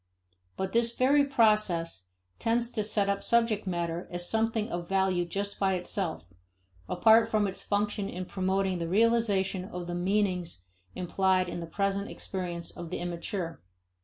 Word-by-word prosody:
But 190 0 -2
this 235 +1 +1
very 280 +3 +4
process 210 - +2 0.3
tends 235 +1 +1
to 215 - -1
set 205 -1 +1
up 200 0 0
subject 230 -3 +2
matter 170 -1 -2
as 175 0 -4
something 225 0 0
of 175 -3 -4
value 190 -2 +2
just 200 +3 -3
by 190 -1 +2
itself, 175 - -2 0.6
apart 220 +5 +5
from 215 -2 +2
its 195 -1 -3
function 205 0 -1
in 185 0 -5
promoting 190 0 0
the 165 -1 -3
realization 205 -3 +2
of 180 -2 -6
the 175 - -5
meanings 180 - -1 0.3
implied 185 +1 +1
in 175 - -4
the 170 - -6
present 200 +3 -1
experience 175 -3 -5
of 170 -1 -8
the - - -3
immature. 175 0 -4
190 Hz, 155 wpm, -29 LUFS, 175-215 Hz, 0.6 s, apart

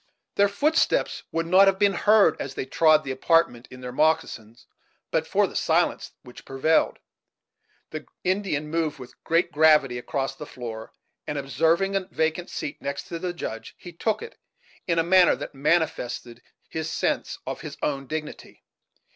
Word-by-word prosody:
Their 200 - +4
footsteps 295 +11 +1
would 165 0 -1
not 185 +3 +6
have 195 -1 +3
been 200 0 +3
heard, 205 -5 +4
as 135 -1 -6
they - - -3
trod 155 +1 +4
the 135 - -4
apartment 130 -3 +1
in 130 0 -12
their 125 0 -6
moccasins, 120 -6 -1 0.5
but - - 0
for - - +2
the - - -8
silence - - +1
which 125 - -13
prevailed. 135 +4 +1 0.9
The 155 -1 -7 0.2
Indian 180 -6 -1
moved 160 -2 -1
with 125 -2 -13
great 170 +1 +1
gravity 150 -5 +4
across 135 +2 -3
the 150 - -9
floor, 115 -3 -8 0.4
and, 150 - -3
observing 165 +8 +1
a 190 -1 -1
vacant 160 +2 -1
seat 145 - -6
next 140 0 -4
to 170 - -5
the 180 +1 -3
Judge, 115 -10 -7
he 175 - -11
took 220 - -1
it, 460 - -11 0.5
in 170 -2 +1
a 165 - +3
manner 180 +1 +5
that - - -8
manifested 135 -5 -1 0.3
his 160 0 -4
sense - - -1
of - - -5
his - - -8
own 135 -2 -2
dignity. 155 +2 -7
155 Hz, 165 wpm, -25 LUFS, 135-175 Hz, 0.9 s, not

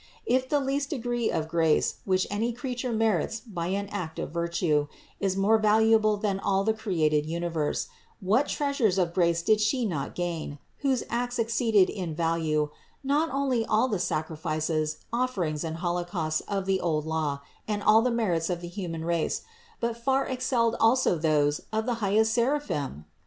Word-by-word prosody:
If 255 +1 +1
the 295 - +3
least 275 +1 -1
degree 240 -4 -1
of 160 - -1
grace, 160 -2 +2
which 185 -1 +2
any 225 +4 0
creature 250 +1 -4
merits 220 -1 +1
by 185 -8 -5
an 200 +2 -1
act 180 -6 -5
of - - -4
virtue, 170 -3 0 0.3
is 195 -1 0
more 215 +3 +4
valuable 215 0 +4
than 200 -2 -1
all 195 0 +1
the 220 +2 +2
created 155 -9 0
universe, 165 -2 -1 0.3
what 220 +8 +2
treasures 275 -10 +1
of 175 -3 +1
grace 170 -2 +2
did 215 +3 +3
She 235 +3 +1
not 155 -9 -3
gain, 170 -4 -3 0.2
whose 270 -3 +1
acts 245 +1 -1
exceeded 225 -4 +3
in 180 -6 -4
value 160 -2 0 0.3
not 295 +4 +1
only 270 -4 0
all 220 +3 +2
the 210 -7 -1
sacri 160 -2 -2
fices, 155 0 -1 0.2
offerings 190 -12 -1
and 160 -1 -3
holocausts 175 -2 -1
of 195 -2 -2
the 190 -1 +1
old 155 -3 0
law 155 -3 -1 0.3
and 205 -1 -2
all 215 +1 +6
the 250 - +1
merits 195 -9 0
of 175 -1 -2
the 175 - -6
human 170 -4 -5
race, 170 -1 0 0.4
but 235 -1 -1
far 265 +3 +1
excelled 250 -3 0
also 230 -3 +4
those 150 -2 +1
of 220 0 -1
the 245 - 0
highest 215 +2 +3
seraphim? 235 - -1
195 Hz, 170 wpm, -27 LUFS, 165-235 Hz, 0.4 s, all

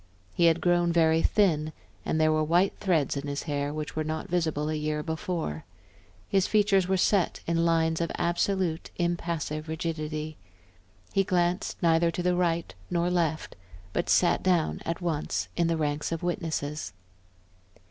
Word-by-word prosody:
He 170 - +3
had 165 0 +4
grown 175 -1 +3
very 165 -1 +3
thin, 155 -8 +2 0.3
and 160 - 0
there 155 0 +4
were 155 0 +2
white 175 +5 +3
threads 165 -9 +1
in 140 +1 -4
his 140 0 -3
hair 145 -2 -2
which 155 0 -5
were 155 - 0
not 155 +1 -4
visible 160 -4 0
a 155 - -1
year 150 0 -2
before; 160 - -3 0.6
his 195 -1 +2
features 200 -3 +3
were 190 0 +2
set 185 -1 +2
in 165 0 +1
lines 165 -1 +2
of 170 - -1
absolute, 175 -1 0
impassive 170 -3 -2
rigidity. 155 -1 -4 0.8
He 195 - +3
glanced 180 0 0
neither 165 0 +4
to 175 +1 -3
the 180 0 +2
right 170 -2 0 0.2
nor 175 +1 0
left, 165 -3 -1 0.4
but - - -1
sat - - +4
down 175 -4 +1
at 165 +2 -3
once 160 -4 -2
in 170 -1 +2
the 165 -1 +1
ranks 150 0 -1
of 165 0 -3
witnesses. 155 - -3
165 Hz, 160 wpm, -27 LUFS, 155-175 Hz, 0.8 s, had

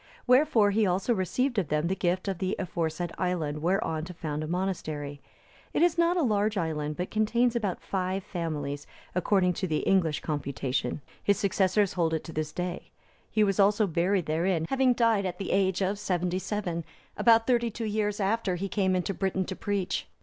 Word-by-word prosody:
Wherefore 250 -5 +4
he 210 0 +2
also 190 +6 +1
received 230 +5 0
of 180 - -1
them 150 +2 0
the 185 +3 0
gift 185 +1 -1
of 190 -3 -2
the 190 +1 -1
aforesaid 170 -2 -2
island 160 -5 -1
whereon 165 -2 0
to 180 0 -9
found 155 -2 -3
a - - -4
monastery. 155 -5 -3 0.5
It - - +4
is 345 -1 +4
not 340 +1 +3
a 340 - +2
large 210 -3 +1
island, 155 -3 -2
but 180 - -3
contains 235 +3 +2
about 205 -6 -2
five 190 0 -2
families, 150 -6 -4 0.3
according 180 0 +2
to 185 +2 -2
the 155 -2 0
English 170 -6 +2
computation; 140 -2 -2 0.2
his 200 - +3
successors 195 0 +2
hold 165 -3 +1
it 160 - -3
to 165 - -9
this 155 -1 -2
day; 180 +1 -4 0.4
he 215 - +2
was 195 -2 +1
also 205 +2 +4
buried 180 +1 +1
therein, 165 +1 0
having 265 -2 +3
died 225 -5 +2
at 180 -1 -5
the 195 - -4
age 190 0 +2
of 200 +2 -1
seventy 180 -2 -1
seven, 185 -5 -3 0.3
about 230 -1 +5
thirty 235 -1 +2
two 225 +1 -5
years 210 -1 -1
after 200 -1 0
he 195 +3 -3
came 190 -2 +1
into 185 +2 -1
Britain 190 0 -1
to 190 - -5
preach. 200 -2 -2
190 Hz, 190 wpm, -28 LUFS, 170-210 Hz, 0.5 s, about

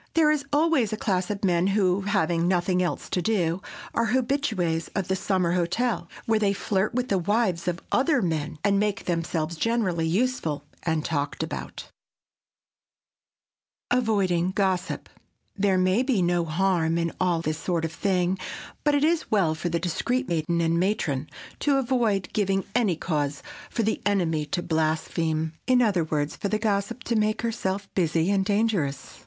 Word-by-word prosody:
There 315 -2 +5
is 295 -2 0
always 290 -7 +3
a 215 - -2
class 185 -4 0
of 205 -1 -4
men 175 0 +2
who, 195 -1 +2
having 170 -3 +1
nothing 180 0 +2
else 180 - -2
to 180 - +1
do, 175 -3 0 0.3
are 230 0 +1
habitués 225 - 0
of 195 -2 -1
the 190 - +2
summer 185 -2 0
hotel, 180 +3 0 0.2
where 220 -1 +2
they 200 -2 +2
flirt 195 +2 -1
with 250 0 -1
the 195 - +2
wives 185 -2 0
of 170 -1 -2
other 275 +2 +3
men 155 -2 -2
and 200 -1 +3
make 205 -1 -1
themselves 165 -1 -1
generally 190 -7 0
useful 170 - 0 0.2
and 160 -2 -1
talked 145 -3 -1
about. - - -6 2.0
[Sidenote: 250 +1 +3
AVOIDING 185 -5 +1
GOSSIP] 190 -3 0 0.5
There 195 -2 +2
may 185 +5 +3
be 255 -8 +1
no 175 -1 +1
harm 165 0 +1
in 170 0 0
all 175 -3 +1
this 155 -1 -2
sort 170 -2 -1
of 165 - -3
thing, 185 -1 0 0.4
but 295 -1 +3
it 285 - +2
is 325 +1 +1
well 190 -7 +3
for 160 +2 -3
the 170 - 0
discreet 245 - -1
maiden 170 +1 0
and 165 0 +2
matron 155 -7 0 0.3
to 285 -2 +2
avoid 235 -7 +1
giving 195 -2 +1
any 220 -7 +2
cause 145 -4 -2 0.3
for 230 - -1
the 220 - 0
enemy 165 -7 +1
to 175 +4 -2
blaspheme,—in 160 +5 0
other 205 -8 +3
words, 150 -1 -1
for - - -3
the 215 - 0
gossip 215 +2 -1
to 235 - -1
make 215 +1 +1
herself 200 -4 -2
busy 170 0 +1
and 195 -1 +2
dangerous. 200 -9 -1
185 Hz, 165 wpm, -26 LUFS, 165-215 Hz, 2.0 s, There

